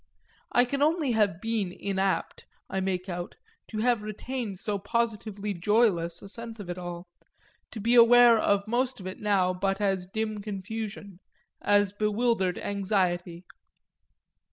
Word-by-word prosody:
I 245 - +4
can 275 +3 -3
only 305 -2 +2
have 205 -6 +2
been 220 -4 -1
inapt, 195 0 -2 0.3
I 190 - -1
make 185 -1 -2
out, 175 -1 -5 0.3
to 215 - -7
have 240 -2 +2
retained 215 0 -5
so 205 +1 -2
positively 210 -1 -2
joyless 175 -3 +1
a - - -8
sense 230 +2 -8
of 185 -3 -5
it 175 - -6
all, 175 0 -6 0.6
to 225 - -7
be 230 +4 +1
aware 240 -1 +7
of 200 -1 +1
most 250 +2 0
of 185 - -9
it 185 - -6
now 195 -3 +2
but 195 +2 -1
as 195 -3 0
dim 215 +1 -3
confusion, 205 -1 -6 0.4
as 205 -1 +3
bewildered 210 -3 +1
anxiety. 185 -3 -1
205 Hz, 145 wpm, -28 LUFS, 190-225 Hz, 0.6 s, aware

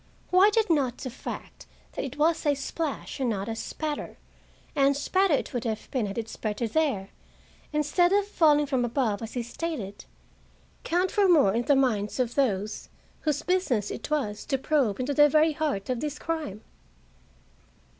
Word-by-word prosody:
Why 370 +3 +7
did 440 +1 +2
not 265 -6 +1
the 255 - -6
fact - - -8 0.2
that - - -4
it 275 +1 -6
was 320 +2 +2
a 290 - +4
splash 285 +2 -4
and 260 -2 +1
not 200 -3 -2
a 225 - -3
spatter 300 +5 -4 0.6
(and 280 -1 +3
spatter 370 +2 +2
it - - -3
would 245 -2 -2
have 220 -3 -4
been 245 -6 0
had 195 - -6
it 230 -1 -2
spurted 220 0 -3
there, 270 -12 0 0.6
instead 300 +4 +2
of 405 0 +3
falling 305 -7 +4
from 265 -3 0
above, 235 -4 0
as 225 0 -6
he 245 - -2
stated), 240 -6 -5 0.8
count 355 +2 +1
for 405 -2 +3
more 285 - +5
in 235 +2 0
the 285 - +4
minds 230 -5 +1
of 245 -2 0
those 215 -6 -1 0.3
whose 300 -2 -1
business 320 - 0
it - - -6
was 260 -9 -1
to 270 - +1
probe 265 -6 +1
into 260 +3 -1
the 295 +1 +6
very 310 +2 +4
heart 295 -10 -2
of 250 -2 -1
this 295 +1 -3
crime? 310 - -4
275 Hz, 175 wpm, -27 LUFS, 230-310 Hz, 0.8 s, Why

